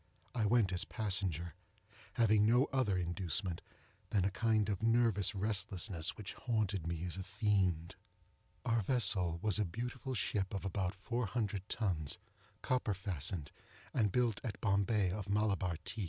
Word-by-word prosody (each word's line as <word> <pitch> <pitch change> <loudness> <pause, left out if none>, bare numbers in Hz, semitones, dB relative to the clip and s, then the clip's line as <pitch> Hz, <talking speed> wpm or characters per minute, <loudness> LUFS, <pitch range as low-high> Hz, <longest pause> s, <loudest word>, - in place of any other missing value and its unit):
I 110 -4 +1
went 105 -4 +3
as 90 +2 +1
passenger—having 100 +2 -1
no 120 +5 +5
other 125 -8 +2
inducement 90 0 -2 0.5
than 95 -3 +2
a 100 - +1
kind 110 0 +2
of 100 -3 -1
nervous 115 -4 +3
restlessness 95 -4 -1
which 105 -2 -5
haunted 105 -8 -1
me 85 -1 -2
as 90 +1 -4
a 95 - -3
fiend. 95 -4 +1 0.7
Our 115 -2 +2
vessel 95 -7 +2
was 105 -2 +3
a - - +4
beautiful 125 +7 -4
ship 100 -3 -1
of 100 - -4
about 95 -1 -1
four 115 +4 -2
hundred 105 -2 -2
tons, 90 -10 -1 0.5
copper 125 -5 +1
fastened, 90 -5 0 0.4
and 105 -5 +2
built 120 -2 +1
at 110 -6 -4
Bombay 100 -1 +2
of 100 +1 -4
Malabar 100 -4 +1
teak. 105 +3 -4
100 Hz, 145 wpm, -35 LUFS, 90-110 Hz, 0.7 s, no